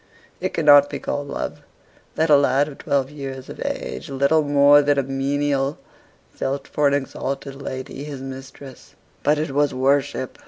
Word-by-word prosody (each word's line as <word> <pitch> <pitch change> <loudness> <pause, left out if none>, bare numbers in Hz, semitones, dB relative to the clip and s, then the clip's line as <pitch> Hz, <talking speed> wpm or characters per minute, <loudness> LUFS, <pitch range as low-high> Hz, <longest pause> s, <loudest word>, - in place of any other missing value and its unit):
It - - -3
cannot 145 -3 +6
be - - -4
called 145 0 -4
love, - - -5 0.5
that 160 0 +1
a - - +9
lad 140 0 +3
of 145 - -10
twelve 140 -1 0
years 135 -3 -7
of - - -9
age, - - -5
little 140 +3 +2
more 145 0 +5
than 145 0 +2
a 140 - +2
menial, 135 +1 -1 0.6
felt 140 +1 -3
for 150 -1 +1
an 140 - +2
exalted 135 0 -4
lady, 130 +1 -6
his 145 -2 -7
mistress: 135 0 -10 0.3
but 150 +1 +2
it 150 -1 -2
was 145 0 +1
worship. 135 0 0
140 Hz, 165 wpm, -22 LUFS, 135-145 Hz, 0.6 s, a